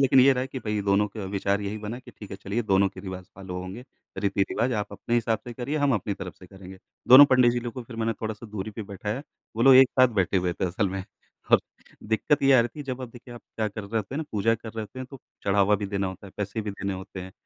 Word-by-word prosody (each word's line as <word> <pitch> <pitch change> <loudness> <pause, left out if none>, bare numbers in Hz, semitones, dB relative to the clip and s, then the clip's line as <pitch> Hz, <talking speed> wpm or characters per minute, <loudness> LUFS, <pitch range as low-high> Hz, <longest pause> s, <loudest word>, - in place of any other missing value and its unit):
लेकिन 135 -1 +6
ये 135 +2 +7
रहा 130 0 -1
कि 135 - -6
भई, 105 -3 -2
दोनों 100 +1 +3
का 105 0 -7
विचार 100 +1 0
यही 105 +1 -4
बना 110 +3 -5
कि, 130 - -14
"ठीक 105 - -12
है, 95 - -5
चलिए, 100 +5 -2
दोनों 100 -2 +3
के 95 - -11
रिवाज़ 95 -1 -7
फ़ॉलो 95 -2 -6
होंगे, 95 +7 -8 0.3
रीति-रिवाज़। 100 +5 0
आप 105 -2 -3
अपने 120 - -3
हिसाब 115 -1 +1
से 120 - -7
करिए, 125 +5 -3
हम 145 -3 +2
अपनी 100 -1 -2
तरफ 90 -3 -7
से 95 - -13
करेंगे।" 95 0 -12 0.3
दोनों 130 +3 +11
पंडित 125 -2 +5
जी 120 - -1
लोगों 120 +1 -6
को - - -18
फिर 115 - -9
मैंने 115 0 0
थोड़ा-सा 110 +1 -4
दूरी 105 0 -4
पे 110 - -6
बैठाया। 105 +5 -5 0.3
वो 115 - +1
लोग 135 +1 +8
एक 130 0 +8
साथ 130 - +7
बैठे 95 +2 +1
हुए 90 -1 +1
थे 90 - -3
असल 95 +3 0
में, 95 +1 -4 0.5
और - - +7 0.4
दिक्कत 110 +7 +1
ये 135 - +6
आ 130 - +7
रही 115 - 0
थी, - - -3
जब 130 -2 -5
आप, 125 - -6
देखिए, 120 +1 -12
आप 120 - -10 0.2
क्या 110 -1 0
कर 105 +1 -7
रहे 105 +3 -4
होते 110 +3 -2
हैं - - -2
ना, 160 - -2
पूजा 110 +2 +2
कर 115 0 -8
रहे 110 - -4
होते 110 +4 -10
हैं, 130 - -5
तो 135 -3 -10 0.2
चढ़ावा 100 +1 +3
भी - - -1
देना 100 -1 -1
होता 95 +2 -7
है, 95 - -13
पैसे 105 +2 -3
भी 105 -1 -4
देने 100 0 -4
होते 95 0 -8
हैं। 95 +1 -9
105 Hz, 280 wpm, -26 LUFS, 100-120 Hz, 0.5 s, दोनों